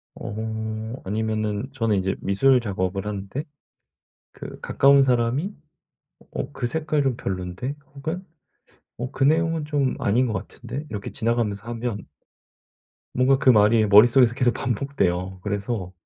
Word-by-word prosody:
어 110 Hz, +1 st, -4 dB
아니면은 110 Hz, +2 st, -2 dB
저는 115 Hz, -6 st, +1 dB
이제 95 Hz, 0 st, 0 dB
미술 125 Hz, +7 st, +4 dB
작업을 95 Hz, -3 st, -2 dB
하는데 105 Hz, +7 st, -4 dB, 0.9 s
그 -, -, -9 dB
가까운 140 Hz, 0 st, +4 dB
사람이 130 Hz, -, +1 dB, 0.8 s
'어 -, -, -4 dB
그 125 Hz, -4 st, -3 dB
색깔 155 Hz, +1 st, 0 dB
좀 135 Hz, -4 st, 0 dB
별론데?' 95 Hz, +8 st, -4 dB, 0.2 s
혹은 160 Hz, +6 st, -4 dB, 0.8 s
'어 125 Hz, +2 st, -4 dB
그 140 Hz, -, 0 dB
내용은 165 Hz, +1 st, +2 dB
좀 145 Hz, -3 st, 0 dB
아닌 120 Hz, +6 st, +2 dB
것 110 Hz, -, -2 dB
같은데?' 135 Hz, +9 st, -6 dB
이렇게 105 Hz, -5 st, -5 dB
지나가면서 115 Hz, -4 st, -1 dB
하면 115 Hz, -3 st, -4 dB, 1.1 s
뭔가 130 Hz, +2 st, +4 dB
그 135 Hz, -1 st, +3 dB
말이 110 Hz, -1 st, +5 dB
머릿속에서 115 Hz, +4 st, +6 dB
계속 120 Hz, -1 st, +2 dB
반복돼요. 95 Hz, -8 st, -1 dB
그래서 100 Hz, -2 st, -3 dB
115 Hz, 280 characters per minute, -24 LUFS, 105-135 Hz, 1.1 s, 머릿속에서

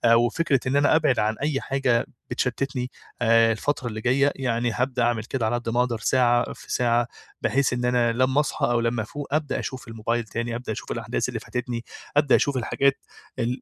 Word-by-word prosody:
وفكرة 130 Hz, +5 st, +2 dB
إن 130 Hz, -, +1 dB
أنا 145 Hz, +2 st, +4 dB
أبعد 155 Hz, -5 st, +3 dB
عن 110 Hz, +1 st, +1 dB
أي 145 Hz, -2 st, 0 dB
حاجة 130 Hz, -3 st, +1 dB, 0.2 s
بتشتّتني 125 Hz, 0 st, -2 dB, 0.3 s
آآ، 115 Hz, -1 st, +5 dB
الفترة 125 Hz, +3 st, -1 dB
اللي 110 Hz, -2 st, -5 dB
جاية، 140 Hz, +4 st, +3 dB
يعني 120 Hz, -2 st, 0 dB
هابدأ 125 Hz, +1 st, 0 dB
أعمل 120 Hz, -2 st, +1 dB
كده 120 Hz, +1 st, -2 dB
على 110 Hz, +2 st, +1 dB
قد 120 Hz, -1 st, -3 dB
ما 120 Hz, +2 st, 0 dB
أقدر 125 Hz, -2 st, +1 dB
ساعة 120 Hz, +1 st, +2 dB
في -, -, -12 dB
ساعة 120 Hz, -1 st, +2 dB, 0.3 s
بحيث 135 Hz, -1 st, +2 dB
إن 125 Hz, 0 st, -1 dB
أنا 120 Hz, -1 st, +2 dB
لمّا 130 Hz, +3 st, +2 dB
أصحى، 150 Hz, -, 0 dB
أو 120 Hz, 0 st, +2 dB
لمّا 115 Hz, 0 st, 0 dB
أفوق 145 Hz, +7 st, -6 dB
أبدأ 155 Hz, -1 st, 0 dB
أشوف 130 Hz, -3 st, -6 dB
الموبايل 115 Hz, +1 st, -2 dB
تاني، 115 Hz, +1 st, -4 dB
أبدأ 120 Hz, -1 st, -4 dB
أشوف 110 Hz, -, -6 dB
الأحداث -, -, -2 dB
اللي -, -, -4 dB
فاتتني، 125 Hz, -1 st, -4 dB, 0.3 s
أبدأ 145 Hz, -2 st, +5 dB
أشوف 140 Hz, -2 st, +1 dB
الحاجات 135 Hz, +3 st, +1 dB, 0.4 s
ال 120 Hz, +3 st, -1 dB
125 Hz, 195 wpm, -25 LUFS, 115-135 Hz, 0.4 s, آآ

